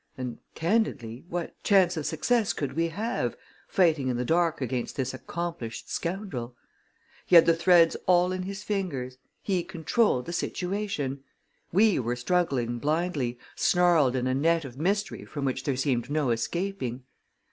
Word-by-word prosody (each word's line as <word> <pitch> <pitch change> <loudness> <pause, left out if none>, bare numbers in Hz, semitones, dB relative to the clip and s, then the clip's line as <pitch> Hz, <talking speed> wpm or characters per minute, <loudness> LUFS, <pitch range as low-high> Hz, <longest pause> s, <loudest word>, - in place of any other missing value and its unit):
And, 125 -2 -5 0.2
candidly, 160 - -1
what 175 0 -5
chance 185 -3 +4
of 155 -3 -3
success 235 -4 +1
could 140 -3 -3
we 165 +3 +1
have, 215 +8 -2 0.3
fighting 160 -8 +2
in 125 -2 0
the 125 - -1
dark 165 +2 +2
against 125 -2 -3
this 130 -2 -2
accomplished 150 -4 -5
scoundrel? 165 - -4 0.7
He 180 - +4
had 165 - +9
the 165 - +4
threads 165 0 +5
all 180 0 +4
in 185 0 -2
his 195 +2 -6
fingers, 135 -11 -3 0.2
he 185 -4 0
controlled 175 - +1
the 170 - -5
situation; 180 -9 -2 0.5
we 205 +1 +4
were 120 0 -1
struggling 125 -4 0
blindly, 150 -4 -1 0.2
snarled 170 -8 +3
in 125 -1 0
a 130 - +1
net 165 +3 +2
of 125 -3 -9
mystery 195 +8 -1
from 145 -2 -5
which 130 0 -2
there 140 -3 0
seemed 130 -2 0
no 145 -4 +1
escaping. 130 0 -2
160 Hz, 155 wpm, -27 LUFS, 130-180 Hz, 0.7 s, had